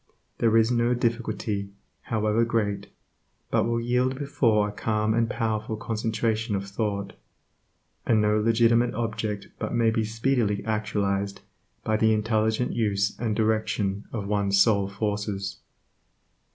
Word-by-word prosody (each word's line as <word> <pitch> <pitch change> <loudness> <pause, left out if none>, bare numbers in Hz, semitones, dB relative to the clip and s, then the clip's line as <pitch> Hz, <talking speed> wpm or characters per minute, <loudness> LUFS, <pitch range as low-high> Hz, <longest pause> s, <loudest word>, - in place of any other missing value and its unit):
There 115 -1 +4
is 115 +1 +4
no 120 0 +2
difficulty, 110 -4 -2 0.3
however 110 +1 +1
great, 105 -3 -1 0.6
but - - +2
will 115 0 0
yield 125 +2 0
before 115 -7 +2
a - - -5
calm 110 +1 0
and 115 0 +1
powerful 110 -2 -2
concentration 110 0 -1
of 100 0 -3
thought, 100 -1 -3 0.9
and 110 -2 +3
no 105 0 +3
legitimate 115 +2 +3
object 110 -3 -3
but - - -3
may 115 -1 +3
be 110 0 0
speedily 110 -2 0
actualized 100 -2 -1 0.4
by 110 0 +1
the 110 0 +3
intelligent 110 +2 0
use 100 -3 0
and 110 -2 -1
direction 110 -2 0
of 105 -4 -4
one's 100 -1 +1
soul 100 -2 +4
forces. 100 -1 -3
110 Hz, 130 wpm, -26 LUFS, 105-115 Hz, 0.9 s, There